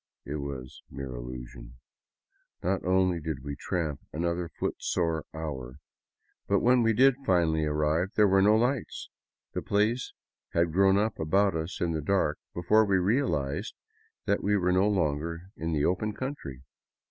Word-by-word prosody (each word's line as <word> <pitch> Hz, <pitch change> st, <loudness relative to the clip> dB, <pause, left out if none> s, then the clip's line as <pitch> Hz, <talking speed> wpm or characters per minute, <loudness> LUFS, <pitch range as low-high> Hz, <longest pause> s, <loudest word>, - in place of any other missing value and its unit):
It 75 Hz, +2 st, -4 dB
was 70 Hz, -3 st, -7 dB
mere 70 Hz, -1 st, -6 dB
illusion. -, -, -8 dB, 0.9 s
Not 95 Hz, +2 st, 0 dB
only 90 Hz, -1 st, +2 dB
did 75 Hz, -4 st, -5 dB
we 70 Hz, 0 st, -5 dB
tramp 80 Hz, -3 st, -3 dB
another 85 Hz, +1 st, -2 dB
footsore 80 Hz, -2 st, -2 dB
hour, 65 Hz, -6 st, -6 dB, 0.7 s
but -, -, +2 dB
when 125 Hz, +1 st, +4 dB
we 115 Hz, -1 st, +3 dB
did 130 Hz, +4 st, +5 dB
finally 80 Hz, -6 st, +2 dB
arrive, 75 Hz, +3 st, +1 dB
there 105 Hz, -1 st, +5 dB
were 95 Hz, 0 st, +4 dB
no 105 Hz, +2 st, +5 dB
lights. 120 Hz, +2 st, -1 dB, 0.4 s
The -, -, -2 dB
place 110 Hz, +5 st, 0 dB, 0.4 s
had 85 Hz, -1 st, +1 dB
grown 95 Hz, +1 st, +4 dB
up 105 Hz, +1 st, 0 dB
about 95 Hz, +5 st, +2 dB
us 80 Hz, +3 st, -4 dB
in 85 Hz, -, 0 dB
the 80 Hz, -1 st, -2 dB
dark 75 Hz, -2 st, +1 dB, 0.2 s
be 85 Hz, -, -4 dB
fore 110 Hz, +5 st, +5 dB
we 100 Hz, -3 st, +2 dB
realized 95 Hz, -, 0 dB, 0.5 s
that 100 Hz, -, +1 dB
we 105 Hz, +1 st, +2 dB
were 90 Hz, -1 st, +1 dB
no 95 Hz, +3 st, +3 dB
longer 85 Hz, 0 st, -1 dB
in 80 Hz, +1 st, -3 dB
the 75 Hz, -2 st, +1 dB
open 105 Hz, +4 st, 0 dB
country. 100 Hz, -, -6 dB
85 Hz, 160 wpm, -28 LUFS, 75-100 Hz, 0.9 s, did